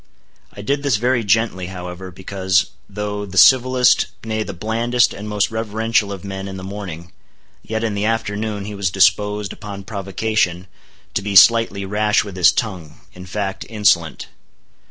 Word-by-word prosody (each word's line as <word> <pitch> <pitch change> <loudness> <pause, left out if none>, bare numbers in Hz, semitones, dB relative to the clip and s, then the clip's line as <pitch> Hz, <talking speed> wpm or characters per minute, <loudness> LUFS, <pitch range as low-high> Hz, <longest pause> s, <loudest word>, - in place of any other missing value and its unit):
I 100 - -10
did 140 +5 0
this 140 -4 +1
very 120 +1 +1
gently, 100 -3 +1
however, 90 0 -7
because, 95 0 -1 0.2
though 105 0 -4
the 95 -1 -7
civilest, 130 +3 +5 0.2
nay, 110 -1 -2
the - - -4
blandest 115 +6 +1
and 105 +1 -7
most 105 -1 0
reverential 110 -1 0
of 95 -3 -7
men 95 0 -6
in 95 0 -7
the 95 - -8
morning, 95 -4 -7 0.5
yet 110 +1 -4
in 110 -2 -1
the 100 +1 -1
afternoon 110 -2 -2
he 105 - -6
was 100 -2 -1
disposed, 100 +2 +2
upon 100 -2 -8
provocation, 95 -2 -1 0.5
to - - 0
be 100 0 -4
slightly 105 -1 +6
rash 105 +2 +1
with 100 -3 -9
his 90 -3 +5
tongue, 90 -9 -4
in 90 0 -11
fact, 95 0 -3
insolent. 100 -8 +1
105 Hz, 160 wpm, -19 LUFS, 95-110 Hz, 0.5 s, slightly